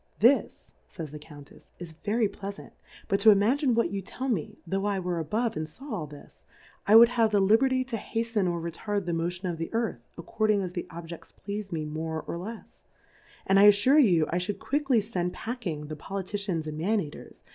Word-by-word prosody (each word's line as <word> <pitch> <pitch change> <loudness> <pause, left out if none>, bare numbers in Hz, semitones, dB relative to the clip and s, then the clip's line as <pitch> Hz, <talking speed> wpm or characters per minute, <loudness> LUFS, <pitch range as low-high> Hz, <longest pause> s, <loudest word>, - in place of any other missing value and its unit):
' - - -37
This^f 245 +6 +2 0.3
ays 155 -3 -5
the 150 - -8
Cotmtefs^ 145 -1 -15
is 175 -2 -8
very 210 +7 0
pleafant, 200 0 -8 0.4
but 195 - +1
to 220 - +7
imagine 235 +6 +4
what 230 -6 +1
you 200 -1 -3
tell 260 +7 -5
me, 200 -11 -2
tho' 195 +3 -2
I 200 -2 0
were 180 -2 -2
above, 220 +9 -1
and 155 0 -4
faw 270 - -9
all 165 -8 -3
this, 145 0 -15 0.4
I 210 - +6
would 230 +1 +10
have 230 -2 +2
the 210 -1 +2
Liberty 255 +7 +3
to 255 -3 -4
haften 225 -3 -1
or 170 - -3
retard 195 +4 -3
the 175 - -2
Motion 175 +3 -2
of 170 -2 -3
the 165 - -4
Earth, 225 - -1 0.2
according 215 +3 0
as 180 -1 -5
tlie 175 - -4
Objefts 170 0 -10
pleas'd 205 -1 -6
me 160 -2 -2
more 160 +1 -4
or - - -5
lefsj 215 +6 -9 0.6
and 195 0 +4
T 200 - +8
alTure 255 +9 +6
you 170 -8 +4
I 175 - +1
fliould 190 +2 -3
quickly 260 +2 +1
fend 180 -4 -3
pack 235 -2 -5
ing 150 -3 -4
the 155 +1 -6
Toiitkiajts 195 0 -4
and 155 -1 -5
Man 210 +6 +1
eaters. 150 -6 -8
195 Hz, 210 wpm, -28 LUFS, 170-225 Hz, 0.6 s, would